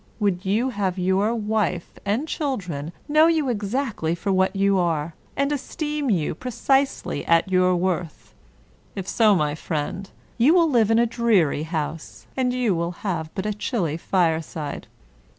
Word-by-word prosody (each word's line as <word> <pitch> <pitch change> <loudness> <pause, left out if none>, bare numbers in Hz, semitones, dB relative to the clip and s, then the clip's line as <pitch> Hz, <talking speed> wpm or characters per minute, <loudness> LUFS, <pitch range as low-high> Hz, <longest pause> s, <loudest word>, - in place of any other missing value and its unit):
Would 195 -3 0
you 225 +7 +1
have 195 -4 -1
your 190 +5 +1
wife 210 -5 -2
and 230 +10 0
children 180 - -3 0.2
know 305 +2 +5
you 315 -5 +2
exactly 210 - -1
for 195 +3 -2
what 190 +1 +2
you 195 0 +3
are, 165 -2 0 0.2
and 280 +1 +1
esteem 295 0 -2
you 170 -8 +1
precisely 255 - 0
at 170 +3 +3
your 185 0 +4
worth? 175 -2 -3 0.6
If 195 -2 -5
so, 215 -2 +4
my 150 -4 +1
friend, 160 +5 -4 0.3
you 285 +9 +5
will 335 -3 +4
live 225 -4 +3
in 225 - +4
a 235 - +4
dreary 225 - +2
house, 160 -1 -4
and 255 -1 +1
you 250 -5 +1
will 170 0 -1
have 165 -5 -2
but 190 0 -3
a 210 - 0
chilly 200 - -2
fire 165 -1 +1
side. 150 -2 -6
195 Hz, 160 wpm, -23 LUFS, 170-240 Hz, 0.6 s, know